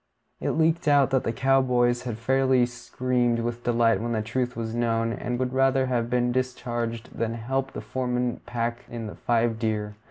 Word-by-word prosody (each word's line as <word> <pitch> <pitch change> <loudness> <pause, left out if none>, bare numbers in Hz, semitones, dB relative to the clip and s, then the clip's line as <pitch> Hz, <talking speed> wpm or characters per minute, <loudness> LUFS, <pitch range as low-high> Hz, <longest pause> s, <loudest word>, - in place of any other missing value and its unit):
It - - -1
leaked 160 0 +2
out 145 -2 +4
that 130 -1 +2
the - - 0
cow 135 +3 +3
boys 120 -1 +2
had 120 -3 -3
fairly 130 +1 +3
screamed 125 -1 -1
with 120 +1 -3
delight 115 -2 +3
when 120 0 -2
the 110 -1 0
truth 125 +3 -2
was 115 -1 -3
known, 115 -1 0
and 120 +1 -3
would 130 0 -1
rather 135 0 +3
have 120 -2 -1
been 125 0 +1
discharged 120 -2 -3
than 115 0 -1
help 135 +4 -2
the - - -5
foreman 125 -1 -2
pack 120 0 -2
in 115 -1 -5
the 105 - -6
five 115 -1 +1
deer. 105 -2 -1
120 Hz, 190 wpm, -26 LUFS, 115-130 Hz, -, out